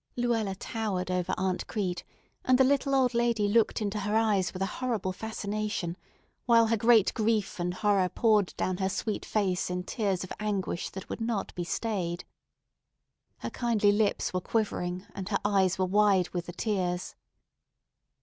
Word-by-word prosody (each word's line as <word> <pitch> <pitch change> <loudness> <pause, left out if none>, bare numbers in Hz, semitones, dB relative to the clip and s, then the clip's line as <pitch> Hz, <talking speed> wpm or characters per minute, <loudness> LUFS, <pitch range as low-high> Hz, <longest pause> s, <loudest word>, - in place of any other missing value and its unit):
'"] - - -42
Luella 230 -5 0
towered 195 -3 -3
over 180 0 -1
Aunt 185 -1 -1
Crete, 180 -5 -2 0.4
and 255 0 +4
the 265 - +6
little 275 +1 +2
old 255 -2 +3
lady 235 -3 +2
looked 220 +1 +2
into 210 +1 -2
her 210 +1 -1
eyes 210 -5 +2
with 190 0 -3
a 195 - -4
horrible 220 -7 -1
fascination, 210 -4 -3 0.5
while 230 -1 +6
her 225 +1 +2
great 225 -1 +4
grief 215 -4 0
and 175 0 0
horror 200 -3 +2
poured 215 -4 +2
down 185 -1 -1
her 190 0 0
sweet 205 +2 -2
face 190 -5 0
in 180 0 -2
tears 195 -2 -1
of 185 - -6
anguish 200 -5 -2
that 190 0 -8
would - - -6
not 225 -3 -2
be 175 - -3
stayed. 175 -3 -2 1.2
Her - - -4
kindly 225 -4 +2
lips 205 -2 +1
were 180 - 0
quivering, 185 -4 -2
and 190 -2 -6
her 200 - +1
eyes 190 -3 +2
were 185 - +1
wide 195 -1 +3
with 175 -1 -4
the 175 - -6
tears. 180 -3 -2
205 Hz, 170 wpm, -29 LUFS, 185-225 Hz, 1.2 s, the